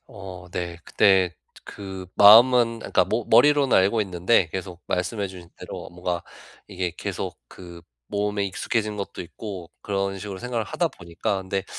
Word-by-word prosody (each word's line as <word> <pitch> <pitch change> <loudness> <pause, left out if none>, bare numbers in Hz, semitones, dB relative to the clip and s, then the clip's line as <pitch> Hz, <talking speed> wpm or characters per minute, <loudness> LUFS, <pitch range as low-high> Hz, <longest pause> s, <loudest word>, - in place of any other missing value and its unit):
어 95 -3 -10
네. 85 -1 -4
근데 95 -3 +4
저 85 - -29 0.3
그 95 -2 -8
마음은 115 +2 +7
그러니까 - - +1
머 115 0 -2
머리로는 140 +3 +5
알고 100 +4 +3
있는데 90 -1 +2
계속 90 -2 -6
말씀해 95 +3 -2
주신 90 -2 -12
대로 - - -8
뭔가 90 0 -3 0.4
이게 90 -3 -3
계속 - - -4
그 85 -2 -12 0.2
몸에 100 0 -1
익숙해진 105 +3 -2
것도 100 - -6
있고 90 -1 -8
그런 100 -1 -2
식으로 100 -1 -7
생각을 120 0 -3
하다 170 - -1
보니까 90 - -4
근데 95 +1 -3
95 Hz, 325 characters per minute, -24 LUFS, 90-105 Hz, 0.4 s, 마음은